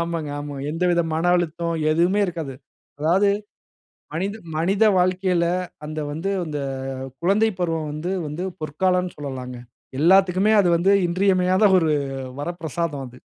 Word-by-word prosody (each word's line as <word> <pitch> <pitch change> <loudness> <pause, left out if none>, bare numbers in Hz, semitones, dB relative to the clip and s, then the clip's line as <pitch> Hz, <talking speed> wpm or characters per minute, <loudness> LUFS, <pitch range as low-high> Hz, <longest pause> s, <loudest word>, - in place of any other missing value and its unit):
ஆமாங்க 170 -3 -2
ஆமாங்க, 145 -1 -6
எந்தவித 175 +1 +1
மன 160 - -1
அழுத்தம், 170 0 -2 0.2
எதுவுமே 175 +6 +2
இருக்காது. 165 -6 -5 0.4
அதாவது 180 +7 +3 0.9
மனித 195 +5 -2 0.2
மனித 195 +7 +2
வாழ்க்கையில, 180 -1 +2 0.4
அந்த 155 +1 -4
வந்து 165 +6 -3
அந்த 150 -3 -4 0.6
குழந்தை 205 +5 +3
பருவம் 165 -3 -1
வந்து 165 +5 -3
வந்து 150 +5 -4 0.2
பொற்காலம்னு 180 +4 0
சொல்லலாங்க, 130 -3 -6 0.4
எல்லாத்துக்குமே 190 +4 +4
அது 185 - +2
வந்து 190 +4 +3 0.2
இன்றியமையாத 185 +1 +2
ஒரு, 160 -2 +1 0.5
வரப்பிரசாதம் 165 -3 -3
அது. 125 +1 -14
170 Hz, 120 wpm, -23 LUFS, 155-185 Hz, 0.9 s, எல்லாத்துக்குமே